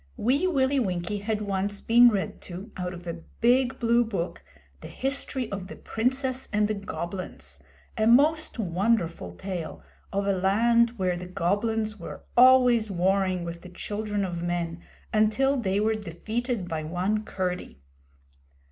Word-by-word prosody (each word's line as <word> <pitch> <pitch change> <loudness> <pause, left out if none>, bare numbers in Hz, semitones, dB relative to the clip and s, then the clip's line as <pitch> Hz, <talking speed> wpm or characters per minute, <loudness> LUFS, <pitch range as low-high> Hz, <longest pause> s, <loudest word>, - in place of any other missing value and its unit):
Wee 275 - +2
Willie 275 -4 +2
Winkie 185 -2 -2
had 210 +1 -2
once 200 0 -2
been 240 +1 +6
read 200 -4 -2
to, 190 +5 -8
out 180 0 -4
of 175 0 -11
a 170 -1 -5 0.2
big 250 +2 +3
blue 235 0 +3
book, 185 - -4 0.4
the - - -9
history 270 -2 -2
of 195 -2 -5
the - - -9
Princess 260 +3 -1
and 210 -1 +2
the 215 - -1
Goblins 175 - -6 0.4
a 215 - +1
most 300 +7 +4
wonderful 180 - 0
tale 175 - -6 0.3
of 200 0 -1
a 200 - +2
land 230 +5 +3
where 185 -2 0
the 180 +1 -6
Goblins 215 +5 -1
were 170 - -9
always 245 -3 +6
warring 185 0 +1
with 170 0 -6
the 180 - -11
children 205 +2 -3
of 175 -2 -4
men 170 -1 -2 0.3
until 220 +6 +3
they 200 -6 0
were 220 +1 +2
defeated 215 +2 -3
by 160 -2 -3
one 185 +7 -1
Curdie. 180 - -4
205 Hz, 150 wpm, -27 LUFS, 180-235 Hz, 0.4 s, been